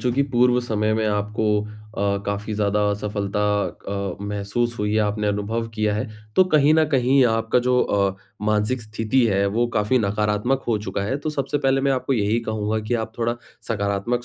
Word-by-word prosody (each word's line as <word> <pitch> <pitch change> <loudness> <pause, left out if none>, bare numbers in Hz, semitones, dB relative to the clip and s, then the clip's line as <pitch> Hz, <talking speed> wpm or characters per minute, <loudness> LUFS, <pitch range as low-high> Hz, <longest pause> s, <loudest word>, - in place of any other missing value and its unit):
चूँकि 125 +2 +1
पूर्व 125 0 +4
समय 110 -3 0
में 110 0 0
आपको 105 +1 -1 0.2
अ, 105 -2 -3
काफ़ी 100 +2 -3
ज़्यादा 105 0 +1
असफलता 105 0 -2 0.5
अ, 100 -2 -3
महसूस 105 +4 -2
हुई 105 0 0
है, - - +3
आपने 105 0 0
अनुभव 105 +3 -2
किया 105 -1 0
है। 105 +3 -2 0.3
तो 185 - +7
कहीं 150 0 +5
न 160 0 +5
कहीं 135 -1 +3
आपका 115 +1 +1
जो 125 0 +2
अ, 100 -1 +1 0.3
मानसिक 105 +4 +1
स्थिति 110 +4 0
है 100 -1 +2
वो 115 +4 +1
काफ़ी 105 +5 +2
नकारात्मक 105 +5 0
हो 110 -3 +2
चुका 100 -1 -3
है। 120 +7 -1
तो 155 +2 -3
सबसे 145 0 -1
पहले 135 -1 +2
मैं 135 0 +2
आपको 130 +1 -1
यही 110 -1 +1
कहूँगा 110 0 -1
कि 120 - +1
आप 110 - -15
थोड़ा 120 0 0 0.3
सकारात्मक 100 +3 -1
110 Hz, 185 wpm, -23 LUFS, 105-125 Hz, 0.5 s, तो